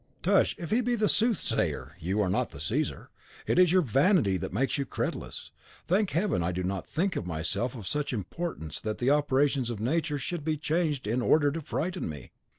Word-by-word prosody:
"Tush! -, -, +3 dB
If 170 Hz, -, -6 dB
he 230 Hz, +3 st, +3 dB
be 245 Hz, 0 st, +1 dB
the 215 Hz, -2 st, +2 dB
soothsayer, 225 Hz, -1 st, 0 dB
you 95 Hz, +6 st, 0 dB
are 95 Hz, -, 0 dB
not -, -, 0 dB
the -, -, -11 dB
Caesar. -, -, -2 dB, 0.3 s
It -, -, +2 dB
is 180 Hz, -2 st, +6 dB
your 185 Hz, 0 st, +4 dB
vanity 135 Hz, -, +3 dB
that -, -, -5 dB
makes 130 Hz, +8 st, 0 dB
you -, -, +1 dB
credulous. -, -, -4 dB, 0.3 s
Thank 195 Hz, +3 st, +2 dB
Heaven, 180 Hz, -, +1 dB
I 85 Hz, +2 st, 0 dB
do 90 Hz, +1 st, -3 dB
not 95 Hz, 0 st, -3 dB
think 180 Hz, +3 st, -1 dB
myself 90 Hz, +9 st, -2 dB
of 110 Hz, -5 st, -8 dB
such 150 Hz, +7 st, -1 dB
importance 105 Hz, -, -4 dB
that 110 Hz, 0 st, -3 dB
the 125 Hz, +3 st, +2 dB
operations 140 Hz, -3 st, +2 dB
of 115 Hz, -4 st, -4 dB
Nature 150 Hz, +6 st, 0 dB
should 165 Hz, +2 st, -4 dB
be 155 Hz, 0 st, 0 dB
changed 155 Hz, -2 st, 0 dB
in 115 Hz, +4 st, 0 dB
order 145 Hz, +3 st, +4 dB
to 165 Hz, +3 st, -4 dB
frighten 175 Hz, -, -3 dB
me." 75 Hz, -5 st, -8 dB
145 Hz, 200 wpm, -29 LUFS, 105-170 Hz, 0.3 s, is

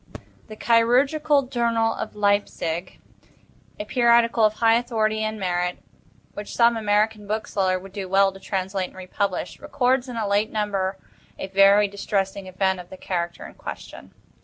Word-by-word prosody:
The 215 Hz, -, -9 dB
"Chirurgical 275 Hz, +7 st, +3 dB
Journal" 235 Hz, -3 st, 0 dB
of 215 Hz, -, -6 dB
Leipsic, 200 Hz, -4 st, -1 dB, 0.8 s
a 210 Hz, -, -4 dB
periodical 235 Hz, -1 st, +3 dB
of 215 Hz, 0 st, +4 dB
high 225 Hz, +1 st, +3 dB
authority 220 Hz, -2 st, 0 dB
and 215 Hz, 0 st, -3 dB
merit, 180 Hz, -1 st, -1 dB, 0.6 s
which 205 Hz, 0 st, -7 dB
some 235 Hz, 0 st, +4 dB
American 210 Hz, -1 st, 0 dB
bookseller 200 Hz, -3 st, -1 dB
would 190 Hz, +1 st, -12 dB
do 195 Hz, -2 st, -5 dB
well 195 Hz, +1 st, +4 dB
to 195 Hz, -, -13 dB
translate 190 Hz, -1 st, -3 dB
and -, -, -18 dB
republish, 185 Hz, +1 st, -3 dB
records 255 Hz, 0 st, 0 dB
in 245 Hz, -, -6 dB
a 215 Hz, -2 st, -1 dB
late 205 Hz, +2 st, +1 dB
number 200 Hz, -3 st, -2 dB, 0.4 s
a -, -, -4 dB
very 195 Hz, +2 st, +5 dB
distressing 195 Hz, -1 st, -3 dB
event 190 Hz, 0 st, 0 dB
of 180 Hz, 0 st, -11 dB
the 190 Hz, -, -10 dB
character 175 Hz, -2 st, -4 dB
in -, -, -11 dB
question. -, -, -9 dB
205 Hz, 155 wpm, -23 LUFS, 190-230 Hz, 0.8 s, very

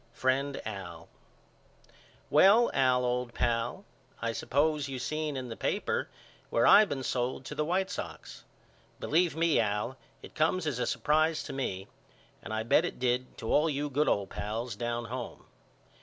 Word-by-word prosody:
FRIEND 135 Hz, +3 st, 0 dB
AL: 95 Hz, -6 st, -7 dB, 1.2 s
Well, 220 Hz, +5 st, +6 dB
Al 130 Hz, -2 st, +3 dB
old 125 Hz, -1 st, -2 dB
pal 120 Hz, -, -1 dB, 0.3 s
I 115 Hz, 0 st, -1 dB
suppose 145 Hz, +4 st, 0 dB
you 135 Hz, -, -4 dB
seen 155 Hz, +2 st, -3 dB
in 125 Hz, -1 st, -5 dB
the 115 Hz, -, -5 dB
paper -, -, -1 dB, 0.4 s
where 115 Hz, -, +2 dB
I 215 Hz, -, +9 dB
been 140 Hz, -8 st, -4 dB
sold 125 Hz, +1 st, -2 dB
to -, -, -6 dB
the 150 Hz, -, -1 dB
White 185 Hz, +4 st, 0 dB
Sox. -, -, -7 dB, 0.6 s
Believe 170 Hz, +2 st, +1 dB
me 165 Hz, -1 st, +3 dB
Al 105 Hz, +4 st, -1 dB, 0.3 s
it -, -, -11 dB
comes 160 Hz, +3 st, +1 dB
as 140 Hz, -6 st, -2 dB
a 125 Hz, -, 0 dB
surprise 155 Hz, +1 st, +1 dB
to -, -, -7 dB
me 95 Hz, -8 st, -3 dB, 0.5 s
and -, -, -8 dB
I 110 Hz, 0 st, -1 dB
bet 120 Hz, +7 st, +4 dB
it 175 Hz, -, -4 dB
did 125 Hz, 0 st, -1 dB
to 115 Hz, -, -2 dB
all 155 Hz, +2 st, +4 dB
you 145 Hz, 0 st, -2 dB
good 150 Hz, +3 st, +1 dB
old 100 Hz, -1 st, 0 dB
pals 110 Hz, +2 st, -4 dB
down 120 Hz, +1 st, -3 dB
home. 120 Hz, +1 st, -7 dB
130 Hz, 165 wpm, -30 LUFS, 115-155 Hz, 1.2 s, I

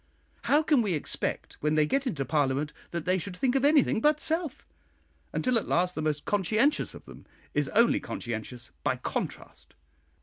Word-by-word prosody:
How 295 Hz, +2 st, +4 dB
can 295 Hz, -5 st, +3 dB
we 200 Hz, -6 st, 0 dB
expect 150 Hz, -, -3 dB
when 150 Hz, +1 st, +1 dB
they 155 Hz, -1 st, +4 dB
get 275 Hz, -, 0 dB
into 145 Hz, -, -2 dB
Parliament 145 Hz, +1 st, 0 dB, 0.2 s
that 170 Hz, -2 st, -4 dB
they 185 Hz, +1 st, +2 dB
should 180 Hz, +1 st, -6 dB
think 250 Hz, +4 st, +1 dB
of 270 Hz, -1 st, +1 dB
anything 285 Hz, -6 st, +4 dB
but 300 Hz, +2 st, +3 dB
self, 320 Hz, -3 st, 0 dB, 0.7 s
until 255 Hz, -2 st, +1 dB
at -, -, -8 dB
last 180 Hz, +1 st, +1 dB
the 155 Hz, -, -4 dB
most 150 Hz, -1 st, -1 dB
conscientious 215 Hz, -, +1 dB
of -, -, -12 dB
them -, -, -13 dB, 0.3 s
is 145 Hz, -2 st, +1 dB
only 230 Hz, +2 st, +4 dB
conscientious 115 Hz, -, -6 dB
by -, -, +1 dB
contrast? -, -, -6 dB
185 Hz, 175 wpm, -28 LUFS, -, 0.7 s, How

